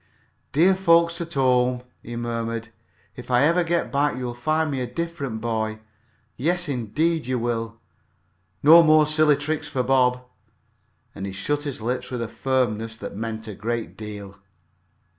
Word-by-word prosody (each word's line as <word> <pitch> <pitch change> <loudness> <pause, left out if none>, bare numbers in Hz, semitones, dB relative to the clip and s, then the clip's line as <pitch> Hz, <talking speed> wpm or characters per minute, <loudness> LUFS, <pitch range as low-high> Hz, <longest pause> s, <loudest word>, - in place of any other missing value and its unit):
"Dear 175 +6 +5
folks 170 -2 +3
at 165 -1 -6
home!" 125 -2 +2 0.2
he 120 - -8
murmured. 115 -1 -3 0.5
"If - - -10
I 125 +1 +4
ever 170 +4 +3
get 170 0 -1
back 145 -1 +1
you'll 125 -1 -4
find 155 +5 0
me 135 -2 -2
a 125 - -2
different 150 -9 -4
boy, 110 -1 -2 0.6
yes, 175 +6 0
indeed, 145 +5 -1
you 130 0 0
will! 115 -1 -2 0.9
No 160 +4 +9
more 155 -1 +5
silly 155 -1 +4
tricks 150 +2 -3
for 130 - -1
Bob!" 125 -1 +2 0.9
And 100 - -6
he - - -5
shut 145 +10 -2
his 135 -6 -5
lips 125 +2 -2
with 125 -2 -3
a - - -4
firmness 115 -4 -1
that - - -7
meant 110 +1 -5
a 105 - -5
great 115 +3 -4
deal. 105 -2 -8
125 Hz, 160 wpm, -24 LUFS, 115-155 Hz, 0.9 s, No